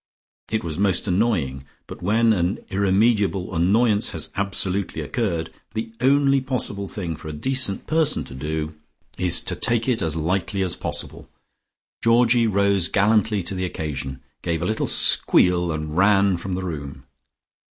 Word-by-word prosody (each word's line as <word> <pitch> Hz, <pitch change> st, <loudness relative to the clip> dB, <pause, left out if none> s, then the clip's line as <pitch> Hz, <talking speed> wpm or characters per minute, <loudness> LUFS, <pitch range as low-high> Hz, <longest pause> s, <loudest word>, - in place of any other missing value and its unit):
It 110 Hz, -2 st, -1 dB
was 80 Hz, 0 st, -4 dB
most 100 Hz, -3 st, +1 dB
annoying, 90 Hz, -, 0 dB, 0.2 s
but -, -, -10 dB
when 110 Hz, +5 st, +3 dB
an 90 Hz, +2 st, -1 dB
irremediable 100 Hz, -1 st, +1 dB
annoyance 105 Hz, +5 st, +2 dB
has -, -, -2 dB
absolutely 100 Hz, -2 st, -1 dB
occurred, 85 Hz, -, -2 dB, 0.2 s
the 110 Hz, +1 st, -4 dB
only 140 Hz, +1 st, +3 dB
possible 120 Hz, -6 st, -2 dB
thing 95 Hz, -9 st, -4 dB
for 80 Hz, +1 st, -11 dB
a -, -, -4 dB
decent 130 Hz, -, 0 dB
person 155 Hz, -1 st, +3 dB
to -, -, -11 dB
do 75 Hz, +3 st, -4 dB, 0.5 s
is 90 Hz, -1 st, +3 dB
to -, -, -2 dB
take 115 Hz, 0 st, +1 dB
it 125 Hz, -3 st, +1 dB
as 80 Hz, -1 st, -1 dB
lightly 95 Hz, +4 st, -1 dB
as 90 Hz, -, -2 dB
possible. -, -, -6 dB, 0.7 s
Georgie 115 Hz, 0 st, +4 dB
rose 100 Hz, -3 st, +2 dB
gallantly 105 Hz, +1 st, +2 dB
to 90 Hz, -, -4 dB
the 95 Hz, -1 st, -3 dB
occasion, 70 Hz, -6 st, -5 dB, 0.2 s
gave 85 Hz, -1 st, -2 dB
a -, -, -1 dB
little 110 Hz, +3 st, -1 dB
squeal 90 Hz, -1 st, +3 dB
and 75 Hz, 0 st, -4 dB
ran 100 Hz, +1 st, +4 dB
from 95 Hz, +2 st, -5 dB
the 95 Hz, +1 st, -3 dB
room. 70 Hz, -5 st, -6 dB
95 Hz, 150 wpm, -22 LUFS, 85-110 Hz, 0.7 s, Georgie